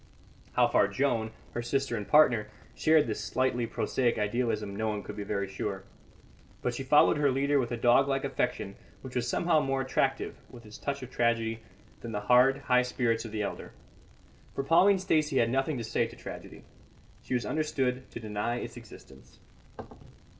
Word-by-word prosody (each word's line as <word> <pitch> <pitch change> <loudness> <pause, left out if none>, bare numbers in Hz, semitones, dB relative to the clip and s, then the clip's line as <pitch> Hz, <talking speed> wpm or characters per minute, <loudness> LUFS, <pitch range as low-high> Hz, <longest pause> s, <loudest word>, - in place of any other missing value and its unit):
How - - +4
far 100 - +3
Joan, 115 +1 0 0.2
her 120 - -3
sister 135 +1 -1
and 105 -3 -5
partner, 120 -6 +5 0.3
shared 155 -1 +4
this 105 -2 -3
slightly 125 0 0
prosaic 120 +1 0
idealism 105 -1 -1
no 110 +2 -1
one 105 -2 -2
could 105 - -8
be 105 - -5
very 100 -1 -2
sure. 95 - -4 0.8
But 125 - 0
she 120 - -5
followed 145 +3 +4
her 145 -1 +3
leader 140 +2 +2
with 120 -2 -2
a 120 - -2
dog 120 +3 +4
like 135 -1 0
affection 125 -7 -2 0.3
which 130 -1 -9
was 125 -1 0
somehow 170 +4 +2
more 135 -2 0
attractive, 130 - -1
with 120 -1 -13
its 105 0 -11
touch 140 -1 -3
of 125 - -9
tragedy, 115 -2 0 0.4
than 115 -1 -7
the 105 - -2
hard, 125 +5 +4
high 125 -1 +3
spirits 120 -2 -1
of 115 - -7
the 105 -1 -2
elder. - - -6 0.8
For 135 - -1
Pauline 185 +7 +5
Stacey 155 -6 +1
had 115 -1 +3
nothing 135 +2 0
to 120 - -4
say 110 - 0
to - - -13
tragedy; - - -10 0.6
she 130 - -3
was 120 -3 -1
understood 130 -2 -1
to - - -8
deny 110 +1 -2
its 120 0 -6
existence. 105 - -14
120 Hz, 180 wpm, -29 LUFS, 110-135 Hz, 0.8 s, partner